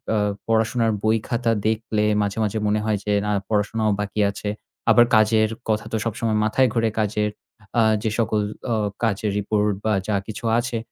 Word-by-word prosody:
আ - - +2 0.3
পড়াশোনার 115 +1 +2
বই-খাতা 115 +2 +1 0.2
দেখলে 110 -1 0 0.2
মাঝে, 100 +1 -2
মাঝে 105 +1 -1
মনে 105 +1 +2
হয় 110 -1 +1
যে, 105 - 0
না 105 - 0 0.2
পড়াশোনাও 110 +1 +1
বাকি 105 +1 -3
আছে। 105 +1 -5 0.4
আবার 120 +2 +7
কাজের 110 0 +4 0.2
কথা 110 0 0
তো - - -1
সবসময় 115 -1 -1
মাথায় 125 +4 +3
ঘোরে। 115 -1 +2
কাজের 105 0 0 0.5
আ - - +6 0.2
যেসকল 110 -1 0 0.3
আ - - +2 0.3
কাজের 105 -2 0
report 105 0 +1
বা 110 - +2
যা 105 - +1
কিছু 110 +2 -7 0.2
আছে 120 -1 -2
110 Hz, 165 wpm, -22 LUFS, 105-115 Hz, 0.5 s, আবার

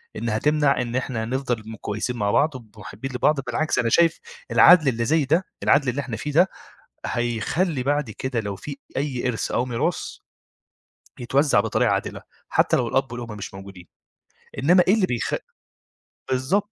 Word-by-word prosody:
إنّها 110 -2 -1
تمنع 150 -1 +2
إن 120 0 -4
إحنا 125 -3 -2
نفضل 120 -3 -3
م - - -7
كويسين 110 +4 -4
مع 100 -1 0
بعض 145 -1 +2
وب 110 -4 -12
مُحبّين 110 +8 -7
لبعض 145 +3 +2
بالعكس، 155 +3 -1
أنا 115 - +1
شايف 165 +3 +3 0.3
العدل 170 -5 +7
اللي 115 -2 +1
زي 155 +1 +2
ده، 165 +7 +1 0.2
العدل 140 -3 +3
اللي 140 +4 -2
إحنا 120 -6 -5
فيه 150 +6 -4
ده، 175 +6 +4 0.6
هيخلّي 125 - -1
بعد 145 -2 0
كده 125 +2 -3
لو 100 -2 -5
في 140 +7 -8 0.2
أي 130 -3 -1
إرث 115 - -2
أو 125 - +1
ميراث، 120 -2 -1 1.2
يتوزّع 135 -1 +2
بطريقة 110 0 +1
عادلة - - -3 0.3
حتّى - - +2
لو 120 - 0
الأب 130 -1 0
والأم 115 -3 -6
مش 95 - -8
موجودين. 95 -2 -11 0.7
إنّما 180 +6 +5
إيه 200 - +6
اللي 200 -4 +2
بيخ 120 -3 -2 1.0
بالضبط. 185 +12 0
130 Hz, 170 wpm, -23 LUFS, 115-150 Hz, 1.2 s, العدل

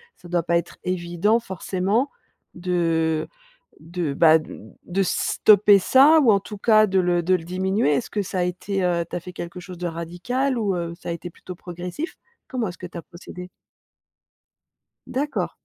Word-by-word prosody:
ça 175 - -15
doit 175 -2 +1
pas 170 0 +2
être 170 - -5
évident 180 +4 +1
forcément 195 +4 -1 0.5
de 165 -3 0 0.5
de, 165 -2 -3
bah, 160 +1 +6
d 155 - -10 0.3
de 195 +2 0
stopper 205 +2 +4
ça 280 - +6
ou 245 -6 +5
en 200 - +4
tout 210 +1 -9
cas 215 0 +5
de 190 -1 +2
le 175 -1 +2
de 185 +2 +3
le 165 - -3
diminuer. 185 -2 0
Est-ce 140 - -1
que 210 - -1
ça 185 0 -4
a - - +2
été, 185 +2 -2
heu, 170 -1 +1
tu - - -5
as - - -1
fait 180 +2 -10
quelque 175 0 -7
chose 180 -1 -10
de 180 - -3
radical 180 +11 -2
ou 200 -4 0
heu, 170 -1 -3
ça 170 - -8
a - - -1
été 170 +1 -6
plutôt 180 +1 -10
progressif? 180 - -6 0.3
Comment 245 -4 -2
est-ce 175 - -10
que 180 - -6
tu 175 - -10
as - - -5
procédé? 180 0 -11 1.6
D'accord. 285 +3 -2
180 Hz, 190 wpm, -23 LUFS, 170-200 Hz, 1.6 s, bah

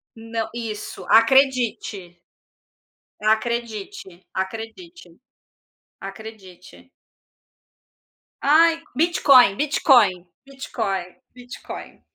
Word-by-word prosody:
Não 225 0 -5
isso 220 -3 -7
acredite. 230 -6 +2 1.0
Acredite, 220 - -3
acredite, 225 - -7 0.9
acredite. 195 0 -12 1.5
Ai, 330 +3 +4
Bitcoin, 275 - +4
Bitcoin, 250 - +3 0.2
Bitcoin, 200 -9 -5 0.2
Bitcoin. 245 0 -10
225 Hz, 55 wpm, -22 LUFS, 195-270 Hz, 1.5 s, Ai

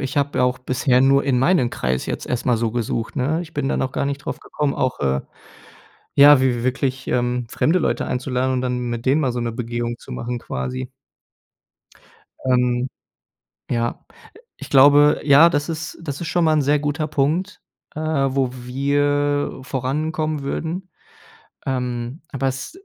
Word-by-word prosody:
ich 135 +2 -4
habe 140 -2 +1
auch 125 0 +1
bisher 125 0 +1
nur 135 +1 +4
in 130 -3 +2
meinen 135 -4 +3
Kreis 65 0 -2
jetzt - - -4
erst 125 0 -3
mal 120 -2 +3
so 115 0 -1
gesucht, 115 +1 -3
ne? 150 +6 0
Ich 160 -1 -12
bin 140 -2 -1
da - - 0
noch 130 0 -1
gar - - -1
nicht 140 0 -2
drauf - - -5
gekommen, 145 -2 -2
auch, 130 -1 -1
äh 65 -1 +1 1.0
ja, 145 -1 +9
w 130 - +2
wi 125 -2 +2
wi - - -5
wirklich, 130 +1 -1
ähm, 125 0 0
fremde 170 +4 +2
Leute - - 0
einzuladen 125 +1 -1
und 125 - 0
dann 125 -1 -1
mit 120 +1 -4
denen 140 +4 +3
mal 130 -3 0
so 120 - -2
'ne 115 -1 -2
Begehung 120 0 -3
zu - - -13
machen, 120 0 -4
quasi. 130 +1 -4 1.6
Ähm, 125 0 +1 0.8
ja, 120 -1 -2 0.5
ich - - -9
glaube 145 +2 +6
ja, 150 +4 +7
das 145 +1 -1
ist 160 0 -5
das 145 -1 -5
ist 165 - -3
schon 175 0 +1
mal 155 - +4
ein 150 - +3
sehr 145 +2 +2
guter 150 +1 -2
Punkt, 155 +8 -1 0.3
äh, - - -4
wo 135 -4 0
wir 145 +3 0
vorankommen 155 +3 -2
würden. 170 +6 -4 0.8
Ähm, 125 +1 -3
aber 135 -1 -1
es 130 - -4
135 Hz, 175 wpm, -21 LUFS, 125-145 Hz, 1.6 s, ja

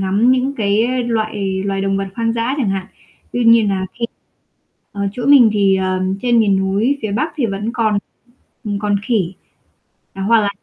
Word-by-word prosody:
ngắm 200 +6 +2
những 260 +2 0
cái 230 +3 0
loại 215 -4 -2
loài 195 -1 -1
động 195 0 0
vật 195 0 -2
hoang 230 0 0
dã 230 +3 -1
chẳng 245 -7 0
hạn. 190 -1 -3 0.5
Tuy 245 -1 0
nhiên 230 -2 +5
nà 190 -1 -1
khi 235 - -1 0.9
ở 200 - -4
chỗ 245 - -5
mình 270 -6 +7
thì, 200 -2 +3
ờ, 185 0 -1 0.2
trên 240 -1 +3
miền 200 -3 +3
núi 205 +9 0
phía 215 -2 -2
Bắc 305 +9 -1
thì 270 -6 +1
vẫn 205 +2 -3
còn 220 -4 +1 0.8
còn 205 0 0
khỉ, 205 -8 0 0.8
à, 195 - -7
hoặc 225 +2 +4
là 205 - 0
215 Hz, 185 wpm, -18 LUFS, 195-235 Hz, 0.9 s, mình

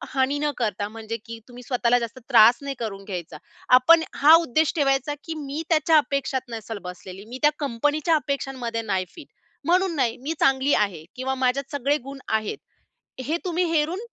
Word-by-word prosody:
हानी 270 +2 +1
न 295 0 0
करता, 210 -3 -2
म्हणजे 225 +1 -6
की 230 -1 -8
तुम्ही 245 0 -12
स्वतःला 245 -1 +2
जास्त 235 +2 -6
त्रास 235 0 +7
नाही 280 -1 -5
करून 200 -4 -5
घ्यायचा. 180 -5 -6 0.4
आपण 325 +5 +5 0.2
हा 305 +3 +8
उद्देश 315 +1 +1
ठेवायचा, 275 -1 +1
की 325 - -5
मी 285 +4 -4
त्याच्या 315 0 +4
अपेक्षात 270 -3 -1
नसेल 225 -1 -6
बसलेली, 185 +2 -10
मी 245 +3 -8
त्या 295 0 +5
कंपनीच्या 295 +5 +1
अपेक्षांमध्ये 270 -6 -3
नाही 190 -4 -1
फिट. 315 -4 -11 0.4
म्हणून 360 0 +2
नाही. 245 -4 0
मी 310 +4 -3
चांगली 270 +1 +3
आहे 185 -7 0
किंवा 265 +1 -2
माझ्यात 265 +2 -1
सगळे 285 +1 0
गुण 275 +1 -9
आहेत. 220 -1 -1 0.7
हे 315 +5 -1
तुम्ही 355 0 0
हेरून 325 +4 0
265 Hz, 175 wpm, -24 LUFS, 230-295 Hz, 0.7 s, हा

